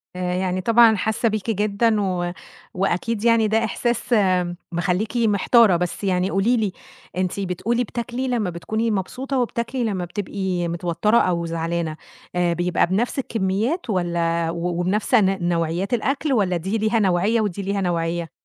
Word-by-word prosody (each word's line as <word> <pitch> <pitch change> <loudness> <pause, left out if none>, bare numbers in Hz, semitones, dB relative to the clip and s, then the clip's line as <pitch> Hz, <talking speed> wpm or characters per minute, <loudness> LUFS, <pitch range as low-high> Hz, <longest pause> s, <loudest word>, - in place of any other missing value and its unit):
آآ 180 0 -2
يعني 185 0 -1
طبعًا 230 +2 +5
حاسّة 220 +3 0
بيكِ 215 0 -3
جدًا 210 +1 +1
و 180 -3 -1 0.4
وأكيد 195 +4 -1
يعني 230 -2 +4
ده 220 +1 +2
إحساس 240 0 0 0.6
مخلّيكِ 180 +7 -1
محتارة، 220 -1 +4
بس 180 +3 -3
يعني 185 -1 +1
قولي 215 +6 +2
لي، 210 -4 0 0.5
أنتِ 185 +1 -1
بتقولي 200 +6 -1
بتاكلي 240 +3 -4
لمّا 230 -7 0
بتكوني 220 +7 -2
مبسوطة 255 +7 -2
وبتاكلي 240 +1 -2
لمّا 195 -6 -1
بتبقي 185 -1 -3
متوتَّرة 175 +6 +1
أو 170 -4 +1
زعلانة، 165 -1 -2 0.4
آآ 175 -1 +2
بيبقى 175 +1 +1
بنَفْس 220 +9 0
الكمّيات 225 - -1
والّا 170 -3 0
و 170 +1 -2
وبنَفْس 200 +7 -1
ن 195 -5 +2
نوعيات 170 +4 -1
الأكل 275 +5 0
والّا 190 -7 +1
دي 190 +6 -2
ليها 220 +1 +1
نوعية 200 +3 +2
ودي 205 -2 -2
ليها 200 +1 -2
نوعية؟ 170 -2 -1
195 Hz, 150 wpm, -22 LUFS, 175-225 Hz, 0.6 s, طبعًا